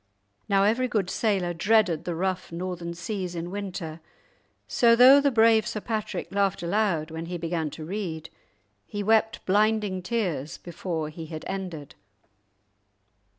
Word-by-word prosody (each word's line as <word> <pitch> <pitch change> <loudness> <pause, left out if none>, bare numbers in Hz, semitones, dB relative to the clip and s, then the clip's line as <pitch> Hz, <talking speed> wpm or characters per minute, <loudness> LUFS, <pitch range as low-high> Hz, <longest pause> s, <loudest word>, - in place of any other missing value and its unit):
Now 195 -1 +4
every 230 +5 +2
good 200 -6 -1
sailor 195 -6 0
dreaded 180 -2 +2
the 175 - -2
rough 185 +1 -2
Northern 170 0 -5
seas 180 +1 -4
in 170 +1 -4
winter, 180 -5 -5 0.7
so 230 -1 +4
though 260 +4 +8
the 280 - +3
brave 225 -3 +4
Sir 215 - -3
Patrick 215 -2 -4
laughed 195 -2 +1
aloud 170 -4 0
when 160 +1 -5
he 175 0 -4
began 165 -2 -2
to 155 +2 -8
read, 170 -4 -5 0.6
he 205 0 -4
wept 220 +1 +2
blinding 210 -1 +2
tears 180 - -2
before 170 -2 -4
he 160 +1 -8
had 155 -1 -7
ended. 180 -7 -5
185 Hz, 145 wpm, -26 LUFS, 170-215 Hz, 0.7 s, though